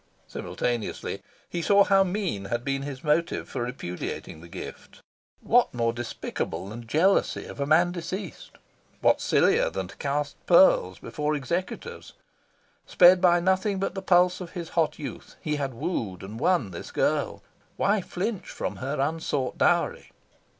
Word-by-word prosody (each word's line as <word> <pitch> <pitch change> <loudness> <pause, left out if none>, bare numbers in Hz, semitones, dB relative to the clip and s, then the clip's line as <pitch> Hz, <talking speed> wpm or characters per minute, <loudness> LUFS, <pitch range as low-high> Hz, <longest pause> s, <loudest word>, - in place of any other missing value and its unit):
Simultaneously, 120 -3 -3 0.3
he 170 - -3
saw 200 +3 +5
how 195 -1 +4
mean 180 - -2
had 120 +4 -3
been 135 0 -1
his 140 -1 -6
motive 165 +3 +1
for - - -4
repudiating 90 -9 -5
the 85 - -12
gift. 85 - -9 0.4
What - - +3
more 115 -1 +1
despicable 110 -6 -4
than 115 +2 -8
jealousy 175 - +2
of - - -10
a 140 - -1
man 170 +3 +4
deceased? 180 +1 -6 0.5
What - - +4
sillier - - +3
than 95 -1 -4
to - - -12
cast 145 0 -3
pearls 170 - +5
before 150 +6 -2
executors? 180 - -4 0.7
Sped 180 0 +6
by 175 -1 +5
nothing 190 +3 +1
but 190 -1 -2
the 195 - -4
pulse 180 0 +3
of 175 - -8
his 170 -3 -5
hot 165 -3 +1
youth, 145 - -8
he 150 -1 -2
had 135 -3 -3
wooed 115 - -3
and 105 +4 -7
won 155 - +2
this 85 - -7
girl. - - 0 0.3
Why 200 0 +2
flinch 190 +3 -4
from - - -4
her 140 +2 -3
unsought 140 -3 -1
dowry? - - +1
150 Hz, 155 wpm, -26 LUFS, 120-180 Hz, 0.7 s, Sped